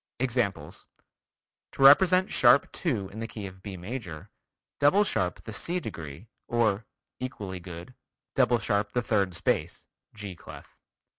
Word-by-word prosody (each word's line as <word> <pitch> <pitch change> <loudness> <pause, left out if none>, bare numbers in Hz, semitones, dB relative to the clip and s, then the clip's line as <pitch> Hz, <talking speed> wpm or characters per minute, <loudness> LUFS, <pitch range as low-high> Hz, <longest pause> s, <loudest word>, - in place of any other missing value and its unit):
Examples: 120 -5 -2 0.9
To 135 - -1
represent 185 +7 +7
sharp 125 +2 +5
2 115 - -2
in 110 - -9
the 115 - -4
key 105 -3 -7
of 95 -1 -10
B 95 -1 -7
major, 95 -3 -7 0.5
double 165 +9 +5
sharp 90 - -1
the 110 - -7
C 175 +10 -1
degree, 80 - -8 0.2
or 115 -3 +1 0.3
(equally 100 -8 -5
good) 85 +7 -10 0.4
double 125 -2 +3
sharp 105 -2 -1
the 125 - 0
third 100 -6 +1
space 85 - -1 0.3
(G 100 -3 -7
clef). - - -13
110 Hz, 140 wpm, -28 LUFS, 95-130 Hz, 0.9 s, represent